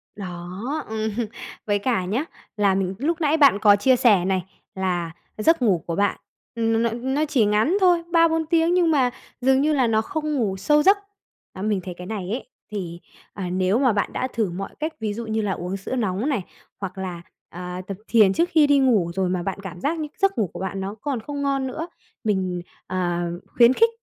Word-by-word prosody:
Đó, 190 - -5
ừm, 220 0 -2 0.6
với 205 -1 +1
cả 200 -4 0
nhá, 225 +11 -1 0.3
là 200 -2 +3
mình 190 0 -1
lúc 330 +4 -1
nãy 305 +1 +3
bạn 275 -9 +6
có 205 -2 +6
chia 255 +6 +4
sẻ 215 -8 +4
này, 190 -1 0 0.3
là 180 -3 -1 0.3
giấc 325 +7 +3
ngủ 185 -8 +2
của 165 - -2
bạn 200 0 +1 0.4
n 225 0 +2
n 240 +3 -1
nó 300 +3 +2
chỉ 265 -8 +2
ngắn 215 - +2
thôi, 350 -2 +4
3-4 325 -1 +3
tiếng 330 +1 +2
nhưng 350 -2 +3
mà 260 -5 +3 0.3
dường 265 +1 +4
như 305 +1 +2
là 260 -4 +3
nó 220 -1 +2
không 305 +5 -3
ngủ 205 -7 0
sâu 295 +9 +3
giấc. 395 +2 +6 0.6
À, 190 - -8
mình 210 -2 0
thấy 180 - -6
cái 180 - -8
này 195 -4 -4
ấy 245 - -4 0.2
thì, 175 -4 -5 0.3
à, 185 -3 -4
nếu 185 +4 +1
mà 255 -4 +3
bạn 205 - -1
đã 255 - -1
thử 220 -5 0
mọi 195 +3 -5
cách, 310 +1 -2
ví 215 -2 -2
dụ 230 +2 -5
như 220 0 -1
là 205 -2 -1
uống 185 +1 -3
sữa 195 +7 -5
nóng 215 +2 -1
này, 260 -8 0 0.4
hoặc 195 -1 -5
là, 180 -3 -5 0.3
à, 180 +1 -6
tập 195 -2 -5
thiền 210 -5 +5
trước 340 - +1
khi 305 -2 +5
đi 285 -1 +5
ngủ 215 -11 +3
rồi 190 -1 +1
mà 180 -1 -1
bạn 195 +2 -3
cảm 180 -2 -7
giác 320 +3 0
như 305 - -3
giấc 390 -7 +1
ngủ 210 -5 +1
của - - -7
bạn 190 +1 -3
nó 195 +2 -4
còn 275 -4 -2
không 285 +5 -5
ngon 275 -1 0
nữa, 320 +6 -4 0.4
mình, 185 -4 0 0.3
ờ, 175 -2 -1 0.3
khuyến 240 +1 +5
khích 460 - +4
220 Hz, 220 wpm, -23 LUFS, 190-280 Hz, 0.6 s, bạn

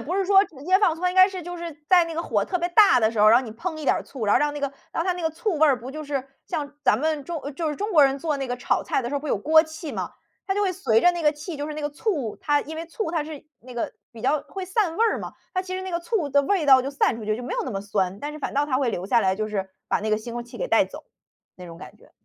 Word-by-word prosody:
不 330 +11 -3
是 390 - +1
说 390 0 +6
直 280 -7 -14
接 375 +2 +4
放 355 -6 +3
醋， 335 - -12
它 360 - +2
应 - - -7
该 375 +1 +7
是 370 -2 -6
就 355 +1 -6
是 340 -1 -6 0.2
在 355 -2 +6
那 330 -1 -6
个 335 - -2
火 - - 0
特 365 - -2
别 350 +1 -1
大 410 - +6
的 220 -1 +3
时 220 -2 -2
候， 215 - +7
然 230 - +7
后 260 - -3
你 220 - -7
烹 320 +7 -5
一 310 - -7
点 - - +4
儿 - - -4
醋， 245 -6 -6
然 205 - +4
后 - - +5
让 295 0 +1
那 295 - -6
个 280 -1 -2 0.2
让 330 - -1
它 365 - +1
那 355 -1 -6
个 320 - +1
醋 335 +2 -2
味 315 - +6
儿 265 -4 +3
不 250 +3 -8
就 310 +2 -6
是 280 -2 -3 0.2
像 290 -1 -4
咱 215 - +3
们 310 0 -1
中 335 -4 -4
就 320 +1 -2
是 295 - -3
中 415 +1 -3
国 300 -4 +7
人 270 0 +1
做 300 -1 -1
那 270 -1 -3
个 245 - -2
炒 245 - 0
菜 - - 0
的 240 - -4
时 285 - -4
候， 280 - -1
不 300 - -6
有 - - +1
锅 315 +8 +5
气 315 -1 -8
嘛。 - - -4 0.3
它 385 - 0
就 410 - +1
会 375 -2 +1
随 230 - +2
着 355 - +7
那 345 -1 -4
个 300 - +5
气， 300 +1 -7
就 290 - -3
是 300 - -5
那 305 - -5
个 295 - -2
醋 295 - -2
它 290 -1 +2
因 315 +2 -8
为 325 +1 -5
醋 335 0 -4
它 325 -3 0
是 300 -2 -9 0.2
那 250 +1 -12
个 235 - -3 0.2
比 230 -1 -12
较 280 +3 +2
会 380 +3 -5
散 370 -3 0
味 455 - +3
儿 445 - +1
嘛。 - - -7 0.2
它 370 - 0
其 370 0 -5
实 375 - -4
那 375 - -5
个 340 - -1
醋 360 -3 -1
的 285 - +5
味 370 0 +1
道 265 -2 +7
就 270 +2 -4
散 275 -3 +1
出 - - -8
去， 215 0 0
就 245 - -7
没 - - -5
有 - - -1
那 260 - -4
么 195 -2 -3
酸。 195 -1 -1
但 295 +4 -5
是 305 - -8
反 290 - -4
倒 285 +1 +2
它 265 -3 0
会 270 - +1
留 180 - -4
下 230 +4 +3
来， 190 -1 +1
就 215 0 -2
是 195 -3 -3 0.2
把 - - +1
那 215 - -3
个 215 - +3
腥 230 +2 -7
味 240 - -4
儿 - - -5
气 240 - -12
给 - - -2
带 - - +4
走， - - -11 0.5
那 180 -1 -11
种 165 -1 -10
感 - - -11
觉。 - - -21
300 Hz, 380 characters per minute, -24 LUFS, 250-350 Hz, 0.5 s, 该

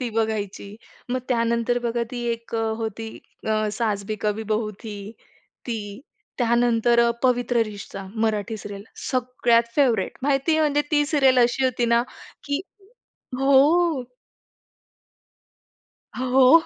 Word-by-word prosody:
ती 250 - -2
बघायची. 215 -2 -2 0.3
मग 255 - +1
त्यानंतर 235 0 +1
बघा 235 0 -1
ती 245 - -5
एक 230 0 -7
अ, - - +1 0.2
होती, 225 0 -4 0.4
अ, 215 0 +1
"सास 210 -3 -1
भी 215 - -3
कभी 210 +1 0
बहू 215 0 0
थी" 220 -3 -6 0.7
ती, 235 -2 -2 0.6
त्यानंतर 235 -1 +3
अ, 235 0 +4
"पवित्र 245 -2 +2
रिश्ता" 200 -1 -8
मराठी 220 0 -1
सीरियल 200 -1 -8 0.3
सगळ्यात 240 -2 +1
फेव्हरेट 245 -9 +2
माहिती 275 +3 +2
आहे, 315 - +3
म्हणजे 295 -1 +2
ती 295 -2 +3
सीरियल 270 -4 +4
अशी 245 +2 +1
होती 250 -2 +1
ना, 235 - +4 0.4
की 285 +1 -1 0.8
हो. 280 +3 +4 2.1
हो. 260 +5 +5
235 Hz, 125 wpm, -24 LUFS, 220-260 Hz, 2.1 s, हो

